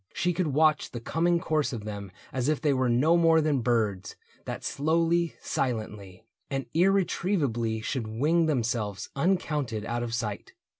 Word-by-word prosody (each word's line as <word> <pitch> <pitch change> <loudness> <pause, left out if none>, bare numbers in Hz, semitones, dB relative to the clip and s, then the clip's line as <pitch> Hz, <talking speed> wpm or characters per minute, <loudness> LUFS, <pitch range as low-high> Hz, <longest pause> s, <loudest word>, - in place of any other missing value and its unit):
She 180 0 +1
could 170 0 0
watch 150 +1 +2
The 120 - -4
coming 170 +8 +1
course 155 -3 0
of 110 -4 -6
them 100 -2 -6 0.2
as 130 +1 0
if 155 - +1
they 150 -3 +2
were 130 -1 +1
No 140 +8 +4
more 165 -1 +5
than 150 -3 +1
birds, 110 -6 0 0.3
that - - -5
slowly, 165 +2 +1
silently. 105 -5 -4 0.2
And 135 -1 -2
irretrievably 170 - +1
should 120 0 -3
wing 155 +10 +2
themselves 115 -7 -1
Uncounted 145 - 0
out 120 +1 -2
of 115 -1 -2
sight. 110 -4 -4
135 Hz, 155 wpm, -27 LUFS, 115-165 Hz, 0.3 s, more